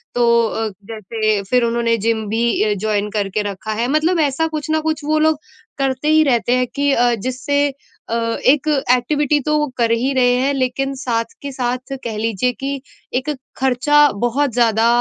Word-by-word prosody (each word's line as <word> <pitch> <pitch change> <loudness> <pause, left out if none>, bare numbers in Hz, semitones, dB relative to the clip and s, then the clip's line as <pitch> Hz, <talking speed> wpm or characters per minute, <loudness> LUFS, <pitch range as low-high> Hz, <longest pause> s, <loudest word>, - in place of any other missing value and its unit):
तो 240 0 +3 0.2
अ, 225 0 -2 0.2
जैसे 215 -1 -1
फिर 250 -1 +3
उन्होंने 230 0 +1
जिम 220 0 -1
भी 225 +2 0 0.2
ए 210 - +1
जॉइन 210 -1 0
करके 205 0 -1
रखा 200 +3 -6
है। 230 +3 -1
मतलब 325 +4 +2
ऐसा 300 +1 +1
कुछ 310 -1 -5
न 315 - +2
कुछ 315 -1 -2
वो 310 +1 +1
लोग 315 -1 +2 0.4
करते 270 +1 -1
ही 310 0 +5
रहते 245 -3 +1
हैं 255 -1 +1
कि 285 0 +1
अ, 240 -1 +3
जिससे 260 +5 -1 0.4
अ, 230 - -1 0.3
एक 290 +3 +4 0.2
एक्टिविटी 290 +4 +2
तो 300 +2 0
वो 300 0 +1
कर 230 -2 +2
ही 250 +4 +1
रहे 250 -1 +3
हैं, 270 +3 +1
लेकिन 270 +1 -1
साथ 235 -4 -1 0.2
के 280 -1 -5
साथ 255 +1 -3
कह 220 -3 -4
लीजिए 225 +2 0
कि 275 0 -4 0.3
एक 260 +4 -1 0.3
ख़र्चा 265 +3 +2 0.2
बहुत 255 +2 +1
ज़्यादा 230 -1 +3
255 Hz, 185 wpm, -19 LUFS, 230-285 Hz, 0.4 s, ही